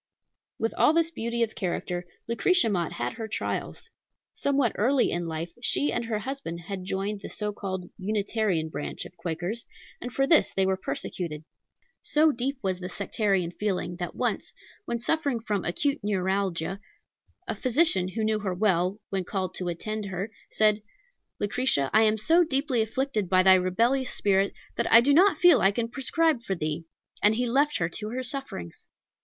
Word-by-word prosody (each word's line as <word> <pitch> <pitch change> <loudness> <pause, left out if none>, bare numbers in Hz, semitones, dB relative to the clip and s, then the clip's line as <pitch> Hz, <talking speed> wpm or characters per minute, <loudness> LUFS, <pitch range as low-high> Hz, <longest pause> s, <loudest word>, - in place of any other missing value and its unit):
With 225 - -1
all 305 - +6
this 330 0 +2
beauty 235 -4 -1
of 220 - -2
character, 175 -1 -3 0.2
Lucretia 235 +5 +3
Mott 175 -4 -1
had 120 +1 -3
her 225 - -5
trials. 220 - -4 0.5
Somewhat 275 -5 +1
early 255 +4 +2
in 175 0 -2
life 165 +1 -4
she 285 +3 +1
and 240 - -1
her 225 -2 -1
husband 240 -7 -5
had 185 +1 -6
joined 200 +2 -2
the - - -7
so 210 -1 -3
called 190 -3 -5
Unitarian 200 -4 0
branch 150 - -5
of 180 - -12
Quakers, 175 +6 -4 0.4
and 245 - -5
for 270 +4 +1
this 310 +2 +4
they 195 - +3
were 190 0 +2
persecuted. 170 -4 -4 0.6
So 310 +1 +3
deep 265 +2 -2
was 185 -1 -1
the 180 0 -5
sectarian 195 -2 0
feeling, 180 -3 -2
that 175 -1 -5
once, - - -2 0.3
when 235 - -1
suffering 280 0 0
from 210 -4 -2
acute 280 +11 0
neuralgia, 190 -2 -1 0.7
a - - 0
physician 250 - +2
who 215 +4 -3
knew 215 0 +1
her 190 -3 -2
well, 185 0 +1
when 190 -1 0
called 190 0 -3
to 180 - -3
attend 215 +5 -3
her, 195 +2 -4 0.2
said, 215 -1 +3 0.6
"Lucretia, 205 - +1
I 220 - +6
am 215 0 +3
so 330 +11 +4
deeply 275 -5 +1
afflicted 220 -3 -1
by 185 0 +5
thy 190 0 +8
rebellious 230 +9 +2
spirit, 195 -1 +1 0.2
that - - 0
I 230 - +10
do 275 +4 +3
not 380 +6 +5
feel 350 -8 +7
that - - +2
I 195 - +6
can 230 +3 -1
prescribe 295 +2 +1
for 195 -4 -2
thee," 155 0 -3 0.4
and 210 +1 +5
he 245 +2 0
left 280 +5 +2
her 165 - 0
to 210 +5 -6
her 255 +3 -3
sufferings. 255 - -6
210 Hz, 180 wpm, -27 LUFS, 185-250 Hz, 0.7 s, I